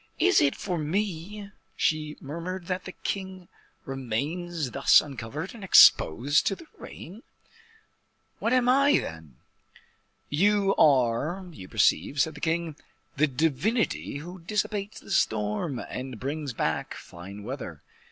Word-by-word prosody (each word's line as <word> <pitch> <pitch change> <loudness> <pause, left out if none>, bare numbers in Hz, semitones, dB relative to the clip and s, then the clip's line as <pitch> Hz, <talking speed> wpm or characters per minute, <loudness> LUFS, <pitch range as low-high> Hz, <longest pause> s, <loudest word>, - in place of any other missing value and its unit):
"Is - - +4
it 140 -1 +3
for 180 -4 -3
me," 200 +4 -3 0.2
she 155 -1 0
murmured, 170 +5 -6
"that 180 +1 -3
the 185 - -6
king 190 -2 -5 0.4
remains 140 +5 -3
thus 140 - +6
uncovered, 140 - -6
and 225 -4 -11
exposed 145 - +6
to 195 - +1
the 335 - -14
rain? 195 +7 -10 1.2
What 230 - 0
am 250 -1 +3
I, 275 +3 +5
then?" 80 -5 -6 0.9
"You 195 +5 +2
are, 140 +6 +3
you 95 - -11
perceive," 140 - +2
said 160 +3 +2
the 150 - -12
king, 160 -1 -1 0.4
"the 155 +2 +4
divinity 160 - 0
who 175 +5 -9
dissipates 205 +2 -2
the - - -12
storm, 110 - 0
and 125 -1 -6
brings 140 0 -4
back - - -2
fine 95 +4 -10
weather." - - -7
160 Hz, 130 wpm, -27 LUFS, 135-190 Hz, 1.2 s, thus